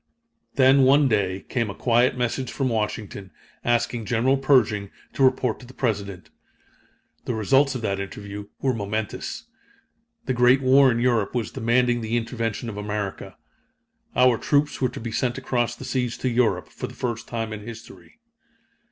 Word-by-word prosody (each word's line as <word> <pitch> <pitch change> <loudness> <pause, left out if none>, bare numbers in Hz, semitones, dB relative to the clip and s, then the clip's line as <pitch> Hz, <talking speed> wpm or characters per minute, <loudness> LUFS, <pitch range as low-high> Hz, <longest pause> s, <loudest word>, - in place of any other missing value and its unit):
Then, 135 +1 +5
one 140 +2 +5
day, 100 -5 0
came 115 -4 -1
a 100 - -6
quiet 120 +1 +2
message 125 +1 -2
from 135 -2 -1
Washington, 105 -3 -3 0.3
asking 120 -1 0
General 125 +5 +2
Pershing 125 -7 +2 0.2
to - - -4
report 130 -3 +2
to 125 - -12
the 130 - -14
President. 100 - -3 0.9
The 120 - -2
results 135 +6 +3
of 125 - -4
that 100 -2 -1
interview 100 +1 -7 0.2
were 130 -1 +2
momentous. 110 0 -4 0.8
The 130 - 0
Great 125 +2 +5
War 135 +1 +6
in 115 - 0
Europe 120 -3 +1
was 115 -4 -2
demanding 120 +1 +1
the 115 +1 -1
intervention 115 -1 -3
of 105 -3 -6
America. 105 -2 -4 0.8
Our 125 -2 +4
troops 145 -1 +1
were 130 - +2
to - - -8
be 115 0 -5
sent 120 +2 -1
across 120 -2 -1
the - - -9
seas 125 -3 -2
to 130 - -1
Europe 120 -1 +1
for - - -6
the - - -12
first 120 -2 -4
time 115 -2 -4
in 105 - -6
history. 110 +1 -12
120 Hz, 165 wpm, -24 LUFS, 105-130 Hz, 0.9 s, War